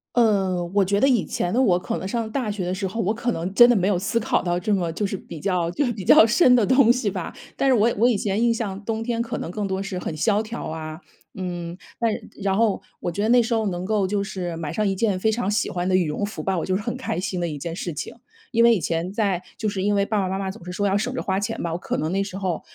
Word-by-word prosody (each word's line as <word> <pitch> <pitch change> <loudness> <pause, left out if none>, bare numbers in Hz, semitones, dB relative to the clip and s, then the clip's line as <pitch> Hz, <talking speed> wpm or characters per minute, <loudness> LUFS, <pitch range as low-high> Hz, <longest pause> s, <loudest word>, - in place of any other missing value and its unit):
嗯， 190 -6 +2
我 200 -1 +4
觉 200 +2 +1
得 270 - +5
以 245 -7 +3
前 175 +3 -2
的 255 - +4
我， 185 -8 +4
可 180 - -3
能 190 - -5
上 230 +1 -2
大 245 -5 -1
学 200 -3 -3
的 180 - -1
时 190 +1 -4
候， 225 +5 -4
我 210 +1 +1
可 235 +2 -1
能 180 -3 -3
真 240 +3 +8
的 240 - +4
没 185 -2 +1
有 200 -2 +2
思 195 +6 0
考 225 - 0
到 175 -1 0
这 205 +4 0
么 175 -4 0
就 205 +5 -1
是 195 - -3
比 170 - -10
较 175 0 0
就 285 +10 0
是 240 - 0
比 205 -4 -7
较 215 - +8
深 250 +4 +5
的 225 -4 +3
东 260 -1 +5
西 250 -3 -1
吧。 185 -3 -4 0.2
但 275 - +1
是 - - +5
我 230 +1 +3
我 235 +4 +4
以 240 - +2
前 200 +2 -1
印 235 -1 +4
象 210 -3 -4
冬 225 +1 -2
天 235 -1 -1
可 235 0 -4
能 - - -5
更 205 0 -3
多 190 0 -2
是 195 -2 -4
很 155 - -4
萧 205 +7 +2
条 225 +2 -6
啊， 155 0 -6 0.3
嗯， 175 -2 -5 0.2
但 230 -1 +2 0.3
然 195 -1 +1
后， 220 -2 +2 0.2
我 175 - -3
觉 205 - -2
得 215 - +1
那 245 +1 +6
时 235 0 0
候 220 -2 +1
能 180 -1 -3
够 210 0 +1
就 200 +1 0
是 180 -4 -4
买 160 -3 -4
上 215 -1 0
一 195 -1 0
件 200 -2 +1
非 220 - +2
常 220 -2 -1
喜 210 +2 0
欢 175 0 -2
的 185 - +1
羽 180 -4 +3
绒 150 +7 -2
服 210 - -6
吧， 190 -2 0
我 - - -2
就 185 - 0
是 205 - -3
很 235 +3 -3
开 255 -9 -3
心 185 -1 -3
的 175 - 0
一 155 -3 -4
件 165 +4 -5
事 175 -2 -4
情。 145 - -5 0.4
因 230 -2 +3
为 235 0 +7
以 205 - -1
前 170 +3 -2
在 200 -4 0 0.2
就 215 - -2
是 200 -2 -2
因 205 +2 +1
为 200 0 +2
爸 215 +1 -1
爸 190 - -1
妈 190 +1 -2
妈 190 -1 -2
总 190 -3 -11
是 180 - -6
说 205 +3 0
要 195 +1 +2
省 250 +5 -2
着 - - -2
花 190 -1 0
钱 200 - -3
吧， 170 - -2
我 165 - -2
可 - - -3
能 155 - -1
那 195 +2 0
时 195 -1 -7
候 185 -4 -2
200 Hz, 330 characters per minute, -23 LUFS, 180-225 Hz, 0.4 s, 真